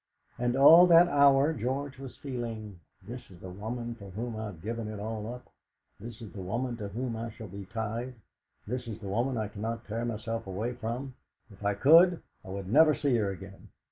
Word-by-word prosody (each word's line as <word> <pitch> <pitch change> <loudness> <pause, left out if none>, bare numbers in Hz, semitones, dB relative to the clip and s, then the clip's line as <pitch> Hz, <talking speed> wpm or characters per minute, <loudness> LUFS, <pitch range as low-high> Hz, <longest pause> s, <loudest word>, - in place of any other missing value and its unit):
And 120 0 +1
all 165 +6 +9
that 170 0 +7
hour 140 0 +5
George 135 +2 -3
was 135 -2 -9
feeling: 115 -7 -6 0.3
'.his - - -6
is 90 -2 -14
the 95 - -9
woman 115 +5 -5
for 100 -4 -11
whom 115 +4 -5
I've 105 -6 -6
given 115 +1 -3
it 105 -1 -6
all 110 +1 -4
up. 125 0 -11 0.5
This 115 +2 -9
is 110 - -9
the 100 - -7
woman 120 +7 -2
to 105 -3 -5
whom 115 +4 -4
I 115 +1 -4
shall 110 0 -10
be 100 +1 -8
tied. 115 +4 -4 0.5
This 125 +2 -4
is 110 -2 -5
the 105 -3 -9
woman 120 +5 0
I 110 -1 -1
cannot 110 +2 -5
tear 115 +2 -3
myself 115 -1 -4
away 105 +6 -3
from. 125 +3 -5 0.4
If 100 +1 -14
I 100 0 +1
could, 165 - +6 0.2
I 100 - -11
would 95 0 -5
never 155 0 +6
see 140 -4 +1
her 105 -3 0
again. 95 0 -9
115 Hz, 205 wpm, -29 LUFS, 105-130 Hz, 0.5 s, all